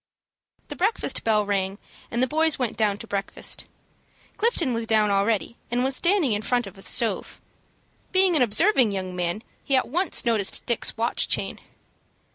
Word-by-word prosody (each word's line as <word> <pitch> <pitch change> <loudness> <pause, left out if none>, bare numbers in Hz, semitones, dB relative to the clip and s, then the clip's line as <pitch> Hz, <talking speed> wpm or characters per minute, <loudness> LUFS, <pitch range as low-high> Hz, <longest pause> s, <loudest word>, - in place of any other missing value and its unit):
The - - -6
breakfast 410 +5 0
bell 215 -2 +2
rang, 195 -1 -1 0.3
and 235 +2 0
the - - +2
boys 315 +2 +2
went 250 -4 -2
down 210 -2 0
to 225 - -9
breakfast. 200 -1 -3 0.7
Clifton 370 - 0
was 230 -1 -3
down 215 -2 +2
already, 200 +3 0
and 245 +1 0
was 265 0 +2
standing 345 - +2
in 205 0 0
front 245 +1 0
of 195 0 -12
stove. 235 -3 -1 0.7
Being 375 -2 +4
an 300 - +3
observing 250 - +3
young 185 -1 -4
man 180 +4 -2 0.2
he 275 - +1
at 260 - +1
once 355 -3 0
noticed 220 -4 +2
Dick's 235 -1 +1
watch 230 +1 0
chain. - - -1
230 Hz, 165 wpm, -24 LUFS, 205-275 Hz, 0.7 s, Being